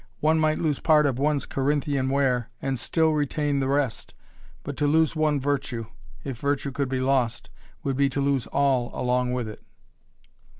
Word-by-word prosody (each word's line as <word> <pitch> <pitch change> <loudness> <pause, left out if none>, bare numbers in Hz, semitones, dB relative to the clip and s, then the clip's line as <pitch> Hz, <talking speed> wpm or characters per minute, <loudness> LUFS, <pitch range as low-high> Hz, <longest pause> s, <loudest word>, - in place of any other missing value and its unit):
One 160 +1 +3
might 155 0 +2
lose 155 -4 0
part 155 -2 +4
of 135 -3 0
one's 145 -1 +1
Corinthian 140 -1 0
ware 130 -4 +1
and 135 -2 -2
still 160 +5 +2
retain 145 -1 0
the 135 - 0
rest, 135 -6 -1 0.5
but 145 - -5
to 150 - +1
lose 160 +2 +3
one 155 -2 +2
virtue 135 -4 -2 0.4
if 130 -4 -5
virtue 140 0 -1
could 135 0 -2
be 130 -1 -1
lost 130 -3 0 0.3
would 135 -2 -1
be 140 0 +3
to 135 - -3
lose 140 -3 0
all 135 -3 +1
along 125 0 +1
with 125 -2 -2
it. 110 - -9
140 Hz, 175 wpm, -25 LUFS, 130-145 Hz, 0.5 s, part